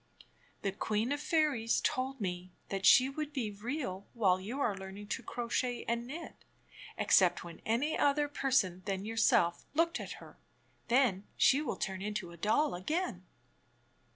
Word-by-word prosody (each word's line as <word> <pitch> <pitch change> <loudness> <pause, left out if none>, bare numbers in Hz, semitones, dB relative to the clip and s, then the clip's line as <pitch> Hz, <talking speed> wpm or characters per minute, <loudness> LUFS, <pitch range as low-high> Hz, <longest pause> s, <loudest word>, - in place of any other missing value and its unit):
"The 195 - 0
Queen 215 +5 -1
of 290 0 -1
Fairies 300 -8 +2
told 265 +1 -1
me 180 -2 -4 0.2
that 195 -1 +1
she 255 +1 +8
would 295 +2 -4
be 245 -7 -2
real 205 -2 -4
while 190 -6 +3
you 235 +9 -5
are 220 -7 +1
learning 195 +2 -9
to - - -2
crochet 240 +1 -2
and 235 +1 -1
knit, 320 +6 -8 0.5
except - - +4
when 170 -1 -10
any 250 +8 +1
other 290 +1 +2
person 265 -11 +1
than 195 0 -2
yourself 215 -6 +2
looked 335 +2 +2
at - - -6
her. - - -14 0.5
Then 235 -6 +2
she 275 +2 +5
wiU 300 - -3
turn 190 -1 -3
into 205 -3 -4
a 170 - -12
doU 220 - +2
again." 185 - -3
230 Hz, 155 wpm, -32 LUFS, 195-275 Hz, 0.5 s, she